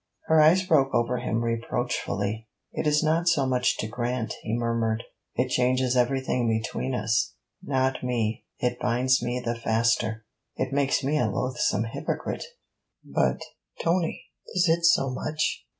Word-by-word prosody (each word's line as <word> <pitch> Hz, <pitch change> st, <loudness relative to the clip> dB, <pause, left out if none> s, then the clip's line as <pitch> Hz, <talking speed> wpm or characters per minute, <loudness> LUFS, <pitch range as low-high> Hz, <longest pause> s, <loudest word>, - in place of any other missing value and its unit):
Her 160 Hz, -1 st, +5 dB
eyes 175 Hz, +5 st, +5 dB
broke 135 Hz, -6 st, +3 dB
over 120 Hz, +1 st, +1 dB
him 115 Hz, -1 st, -1 dB
reproachfully. 115 Hz, -2 st, -2 dB, 0.2 s
'It -, -, -2 dB
is 150 Hz, +1 st, +3 dB
not 165 Hz, +2 st, +1 dB
so 145 Hz, -5 st, +2 dB
much 125 Hz, -1 st, +1 dB
to 110 Hz, -, -3 dB
grant,' 120 Hz, +1 st, -2 dB
he 110 Hz, +2 st, -2 dB
murmured. 115 Hz, -1 st, 0 dB, 0.3 s
'It 125 Hz, +1 st, +1 dB
changes 130 Hz, 0 st, +2 dB
everything 125 Hz, -1 st, +1 dB
between 115 Hz, +3 st, -1 dB
us.' 110 Hz, 0 st, 0 dB, 0.3 s
'Not 130 Hz, -1 st, 0 dB
me. 115 Hz, -3 st, -1 dB
It 125 Hz, 0 st, -1 dB
binds 125 Hz, +2 st, +2 dB
me 120 Hz, +1 st, -2 dB
the 115 Hz, -, 0 dB
faster.' 115 Hz, -1 st, 0 dB, 0.3 s
'It -, -, -2 dB
makes 140 Hz, 0 st, +1 dB
me 150 Hz, +3 st, +1 dB
a 120 Hz, -, +2 dB
loathsome 120 Hz, -1 st, 0 dB
hypocrite.' 115 Hz, -, -4 dB, 0.6 s
'But, -, -, 0 dB, 0.4 s
Tony! 170 Hz, 0 st, 0 dB, 0.3 s
is 180 Hz, -1 st, +3 dB
it 165 Hz, +1 st, +2 dB
so 170 Hz, -6 st, +4 dB
much?' 155 Hz, +4 st, -2 dB
125 Hz, 150 wpm, -26 LUFS, 115-135 Hz, 0.6 s, Her